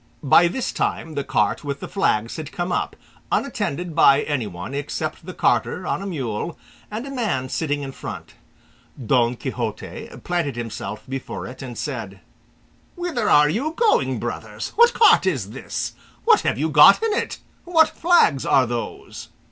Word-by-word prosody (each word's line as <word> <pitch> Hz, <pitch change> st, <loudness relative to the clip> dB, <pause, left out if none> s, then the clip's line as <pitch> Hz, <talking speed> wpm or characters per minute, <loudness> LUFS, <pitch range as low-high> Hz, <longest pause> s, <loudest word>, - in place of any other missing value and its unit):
By 160 Hz, +5 st, +6 dB
this 250 Hz, +9 st, -2 dB
time 160 Hz, -, -2 dB
the 140 Hz, -1 st, -2 dB
cart 105 Hz, -1 st, 0 dB
with 140 Hz, -1 st, -4 dB
the -, -, -6 dB
flags 115 Hz, -, 0 dB
had 155 Hz, -2 st, -6 dB
come 180 Hz, -2 st, -3 dB
up, -, -, -1 dB, 0.4 s
unattended 180 Hz, -, -2 dB
by 140 Hz, -3 st, +5 dB
anyone 105 Hz, -6 st, -4 dB
except 155 Hz, +3 st, -4 dB
the 185 Hz, -, -6 dB
carter 180 Hz, -, +1 dB
on -, -, -1 dB
a 200 Hz, -, -5 dB
mule, 135 Hz, -, -4 dB, 0.3 s
and 220 Hz, +4 st, -5 dB
a 275 Hz, -, -7 dB
man 205 Hz, -, -1 dB
sitting 145 Hz, -1 st, -2 dB
in 135 Hz, -, -5 dB
front. -, -, -8 dB, 0.7 s
Don 120 Hz, 0 st, +2 dB
Quixote 120 Hz, -4 st, -5 dB
planted 170 Hz, -7 st, -1 dB
himself 115 Hz, -2 st, -5 dB
before 135 Hz, 0 st, -5 dB
it 130 Hz, -, -9 dB
and 125 Hz, -3 st, -7 dB
said, 110 Hz, -9 st, -5 dB, 0.8 s
"Whither 340 Hz, -, -1 dB
are 150 Hz, 0 st, +6 dB
you 260 Hz, -, -1 dB
going, 465 Hz, -2 st, +2 dB
brothers? -, -, -5 dB
What 475 Hz, +1 st, +6 dB
cart 430 Hz, -, +6 dB
is 125 Hz, -, -1 dB
this? -, -, -4 dB, 0.3 s
What -, -, +6 dB
have -, -, 0 dB
you 155 Hz, +4 st, 0 dB
got 150 Hz, -, +7 dB
in 450 Hz, -2 st, +1 dB
it? -, -, -2 dB, 0.3 s
What 325 Hz, -2 st, +5 dB
flags 335 Hz, -, +3 dB
are 130 Hz, -, +4 dB
those?" 120 Hz, -1 st, -6 dB
150 Hz, 165 wpm, -22 LUFS, 130-200 Hz, 0.8 s, got